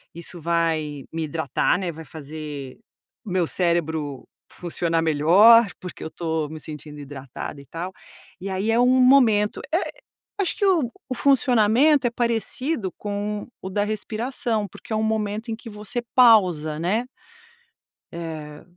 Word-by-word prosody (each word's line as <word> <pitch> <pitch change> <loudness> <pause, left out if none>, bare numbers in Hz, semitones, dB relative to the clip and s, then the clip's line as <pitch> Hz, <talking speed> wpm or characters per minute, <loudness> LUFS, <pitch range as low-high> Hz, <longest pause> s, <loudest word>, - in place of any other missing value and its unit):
Isso 170 0 -9
vai 160 -4 0
me 165 -1 -2
hidratar, 155 +2 0
né. 180 -3 -2
Vai 160 +1 -10
fazer 150 -3 -8 0.5
o - - -7
meu 180 -2 +2
cérebro 160 -6 -1 0.2
funcionar 165 -1 -1
melhor, 190 +10 +6
porque 180 -2 -8
eu 160 - -5
tô 160 -2 -2
me 155 0 -8
sentindo 150 -1 -9
hidratada 140 0 -8
e - - -16
tal. 175 +5 -6 0.5
E 195 - -4
aí 190 +4 0
é 230 - +3
um 245 - +5
momento. 235 -6 +4
É, 335 - +4 0.6
acho 365 - 0
que 405 - +1
o 325 -11 +2 0.2
o 255 - -2
funcionamento 255 +1 +4
é - - -2
parecido 235 - -1
com 205 0 -4
o 190 - -5
da 205 +2 0
respiração, 220 +1 -2
porque 200 - -15
é - - +1
um 215 - 0
momento 220 +1 -1
em 220 - -1
que 230 0 -11
você 210 +3 -4
pausa, 185 - +5
né? 210 +9 0 1.1
Eh, 155 -3 -7
185 Hz, 150 wpm, -23 LUFS, 160-225 Hz, 1.1 s, melhor